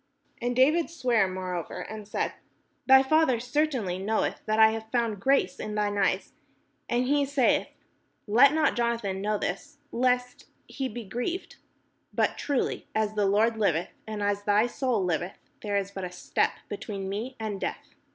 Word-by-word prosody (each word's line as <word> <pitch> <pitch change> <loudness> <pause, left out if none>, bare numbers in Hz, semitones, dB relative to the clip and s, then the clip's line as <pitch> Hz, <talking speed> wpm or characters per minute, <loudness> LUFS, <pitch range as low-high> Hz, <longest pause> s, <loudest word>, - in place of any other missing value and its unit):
And 245 +1 -1
David 305 +6 +4
sware 245 - +2
moreover, 185 -2 -4
and 215 -1 -8
said: 205 - -2 0.5
"Thy 265 0 +8
father 290 -3 +3
certainly 245 -7 -1
knoweth 215 +3 -1
that 215 0 +1
I 220 0 +7
have 220 0 -6
found 230 -4 0
grace 275 +4 +2
in 210 - -4
thine 205 -1 0
eyes; 195 -1 0 0.6
and 245 +1 +1
he 285 +2 +2
saith, 275 -2 +2 0.6
'Let 240 +6 +6
not 310 0 +2
Jonathan 230 -5 -1
know 210 +1 0
this, 285 +11 -4
lest 250 0 0 0.2
he 270 - -4
5SS - - +1
PALESTINE - - -12
be 240 - -4
grieved 245 - -4 0.3
': - - -45
but - - +2
truly 285 -3 -2
as 215 -1 +1
the 205 -2 +1
Lord 220 +3 +3
liveth, 175 -6 +1 0.2
and 215 -1 -4
as 205 0 0
thy 205 +2 +3
soul 245 -5 0
liveth, 175 +2 -2 0.2
there 205 -1 -1
is 200 0 -2
but 195 -1 -6
a 180 - -4
step 180 - 0
between 200 -1 -5
me 220 +7 -4
and 215 -3 -4
death." - - -5
220 Hz, 175 wpm, -27 LUFS, 200-255 Hz, 0.6 s, Thy